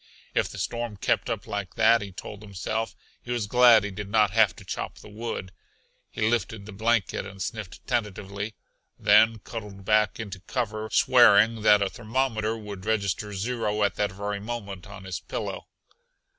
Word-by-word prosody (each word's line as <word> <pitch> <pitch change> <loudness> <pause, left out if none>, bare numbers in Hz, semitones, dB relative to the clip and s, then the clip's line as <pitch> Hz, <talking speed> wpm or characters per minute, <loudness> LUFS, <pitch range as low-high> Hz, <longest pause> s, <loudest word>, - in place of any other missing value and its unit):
If - - +1
the - - -9
storm 120 -3 -3
kept - - 0
up - - -3
like 100 -3 -4
that, 115 +1 +5
he 100 -1 -6
told 100 +3 -9
himself, 105 +2 -3 0.3
he - - -15
was 120 -3 0
glad 120 -1 +6
he 105 - -3
did 100 +1 -6
not 105 -1 +3
have 110 -1 +4
to - - -13
chop - - -5
the - - -13
wood. 105 -3 -5 0.6
He 110 - -1
lifted 110 -3 -1
the 110 - -9
blanket 110 +1 0
and 95 0 -10
sniffed 105 -1 -6
tentatively, 105 -3 -3 0.4
then 110 +2 +5
cuddled 105 -3 -8
back 105 -1 +3
into 100 -4 -6
cover 110 +1 -3
swearing 115 -2 +5
that 105 -1 +6
a 100 - 0
thermometer 115 -2 -1
would 105 -3 -8
register 105 -1 -1
zero 105 0 -1
at 100 - +2
that 105 -1 -1
very 100 +1 -3
moment 100 -3 -6
on 100 -1 -10
his 95 -1 -4
pillow. - - -5
105 Hz, 170 wpm, -26 LUFS, 100-115 Hz, 0.6 s, glad